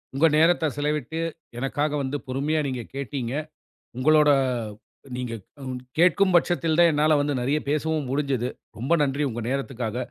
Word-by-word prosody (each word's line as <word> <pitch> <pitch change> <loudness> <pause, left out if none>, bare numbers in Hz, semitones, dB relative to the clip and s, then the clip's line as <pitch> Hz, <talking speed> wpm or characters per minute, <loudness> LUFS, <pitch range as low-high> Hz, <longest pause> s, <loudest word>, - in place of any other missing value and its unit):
உங்க 155 +4 +5
நேரத்த 165 +1 +4
செலவிட்டு, 150 +1 -2 0.4
எனக்காக 145 +3 -1
வந்து 135 +1 -2
பொறுமையா 145 +5 0
நீங்க 130 -2 -3
கேட்டீங்க. 135 -2 -3 0.7
உங்களோட 150 +2 +5 0.9
நீங்க 125 -2 -4 0.7
கேட்கும் 180 +2 +4
பட்சத்தில் 170 -2 +2
தான் 170 -1 +7
என்னால் 150 0 +3
வந்து 145 0 0
நிறைய 140 +5 +1
பேசவும் 150 -1 0
முடிஞ்சது. 135 -3 0 0.3
ரொம்ப 130 +8 -1
நன்றி 140 +1 0
உங்க 120 0 -5
நேரத்துக்காக. 125 -4 -3
145 Hz, 130 wpm, -25 LUFS, 130-155 Hz, 0.9 s, தான்